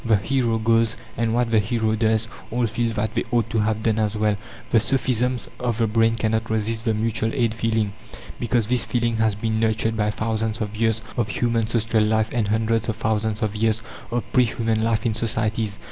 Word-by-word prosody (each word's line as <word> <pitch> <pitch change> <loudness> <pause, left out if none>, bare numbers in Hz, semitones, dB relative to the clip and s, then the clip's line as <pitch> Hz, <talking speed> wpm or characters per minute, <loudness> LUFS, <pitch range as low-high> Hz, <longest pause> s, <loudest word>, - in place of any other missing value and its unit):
The 110 -3 +3
hero 120 +2 0
goes; 115 0 +2 0.2
and 115 -1 0
what 120 0 +1
the 110 - +5
hero 110 +1 0
does, 110 0 +1 0.2
all 120 +1 0
feel 115 +1 -1
that 110 +1 -1
they - - 0
ought 115 -2 0
to 115 - +1
have 110 0 0
done 110 -1 +1
as 105 0 0
well. 105 -1 +2 0.4
The 115 - +5
sophisms 125 0 0
of 120 -3 -1
the 115 - +2
brain 115 +1 +2
cannot 110 0 -1
resist 110 +1 -1
the 110 -2 +2
mutual 110 +1 0
aid 120 -4 +1
feeling, 110 -2 0 0.5
because 120 -1 +1
this 125 +1 +2
feeling 120 -2 0
has 110 -2 +2
been 110 +1 -1
nurtured 110 0 +1
by 105 -1 +1
thousands 110 +1 -1
of 105 -1 -4
years 110 0 +1
of 115 -3 +1
human 115 0 0
social 115 -1 +1
life 110 +1 +2
and 115 -4 +1
hundreds 110 +1 +1
of 110 - -1
thousands 110 0 -1
of 110 -1 -1
years 110 0 +1 0.3
of 120 0 -1
pre 125 -1 +5
human 115 -1 -1
life 115 -1 0
in 115 - +2
societies. 110 -2 -1
110 Hz, 205 wpm, -23 LUFS, 110-115 Hz, 0.5 s, the